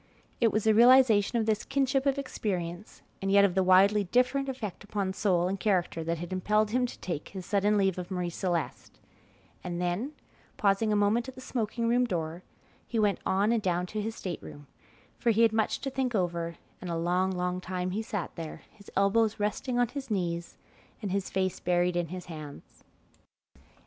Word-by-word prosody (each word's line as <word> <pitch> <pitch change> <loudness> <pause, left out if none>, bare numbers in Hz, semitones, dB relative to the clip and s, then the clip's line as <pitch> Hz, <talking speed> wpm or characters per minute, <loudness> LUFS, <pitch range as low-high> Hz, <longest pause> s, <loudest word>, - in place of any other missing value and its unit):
It 230 -2 +4
was 215 - 0
the 220 - +4
realization 235 -2 +6
of 225 - +1
this 215 -1 0
kinship 270 0 +1
of 275 0 +2
experience 185 -8 -4 0.2
and 195 0 -1
yet 200 0 +7
of 190 - +1
the 190 - +2
widely 195 +3 +5
different 255 +7 +1
effect 225 -8 -5
upon 200 -2 -2
soul 185 -3 +1
and 195 +1 -2
character 180 -5 0
that 165 +1 -1
had 175 +3 -6
impelled 210 +3 +1
him 250 +1 +2
to - - -10
take 170 -5 -4
his 190 -2 -8
sudden 205 +2 +2
leave 195 -2 +1
of 180 0 -6
Marie 180 -2 -2
Celeste, 175 -2 -3 0.7
and 175 -1 -4
then, 180 +11 -2 0.4
pausing 205 +2 +2
a - - +3
moment 210 +5 +2
at 260 - -11
the - - -10
smoking 235 -2 -2
room 245 +2 +3
door, 170 -5 -3 0.5
he 235 - -3
went 210 -2 +2
on 200 +4 +2
and 235 -2 +2
down 180 -2 0
to 210 +4 -4
his 220 +2 -4
state 180 -3 -5
room, 145 0 -11 0.5
for 240 - +1
he 225 +1 +4
had 225 -1 +4
much 220 -1 0
to 270 - -3
think 260 -2 -1
over, 170 -3 -1 0.3
and 180 - -6
a 170 - -1
long, 180 +3 +1
long 180 0 -2
time 180 0 -3
he 210 +4 -1
sat 205 -5 -4
there, 165 -2 -7
his 205 -2 -16
elbows 210 +3 +2
resting 210 +4 -1
on 245 -2 +2
his 270 0 -6
knees 170 -4 -2 0.5
and 200 - -2
his 195 0 -1
face 185 -1 -1
buried 175 0 +1
in 175 -1 0
his 180 +2 -7
hands. 155 -4 -10
200 Hz, 200 wpm, -29 LUFS, 180-225 Hz, 0.7 s, yet